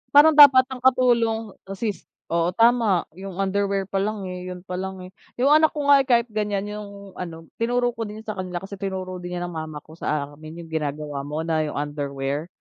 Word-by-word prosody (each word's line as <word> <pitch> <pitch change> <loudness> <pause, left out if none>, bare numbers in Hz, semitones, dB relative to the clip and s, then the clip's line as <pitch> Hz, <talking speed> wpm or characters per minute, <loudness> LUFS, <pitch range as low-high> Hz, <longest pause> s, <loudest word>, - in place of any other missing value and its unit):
parang 300 +2 +9
dapat 285 -4 +9
ang 255 - -5
katulong 235 -4 +2 0.2
assist 195 -1 -4 0.2
oo, 170 +1 +1
tama 230 -6 +4
yung 190 +1 -8
underwear 195 0 0
palang 200 +2 -2
yun 180 -1 -7
palang, 190 0 -5
eh, 185 - -12 0.2
yung 265 +4 +2
anak 310 +1 +5
ko 295 -1 -2
nga 280 - +8
eh, 265 - -6
kahit 235 -1 +3
ganyan 210 -2 -1
yung, 200 -1 -8
ano, 165 -2 -8
tinuro 245 +1 +1
ko 225 -2 -5
din 215 +1 -9
sa 215 - -4
kanila 180 -1 -4
kasi 195 0 -8
tinuro 185 -2 -4
din 175 0 -6
niya 175 - -3
ng 175 - -5
mama 155 -2 -6
ko 155 - -17
sa 150 -3 -2
amin 155 +3 -10
yung 165 - -14
ginagawa 150 -2 -3
mo 155 +2 -3
na 160 -1 +1
yung - - -6
underwear, 145 +1 -3
195 Hz, 200 wpm, -23 LUFS, 165-225 Hz, 0.2 s, parang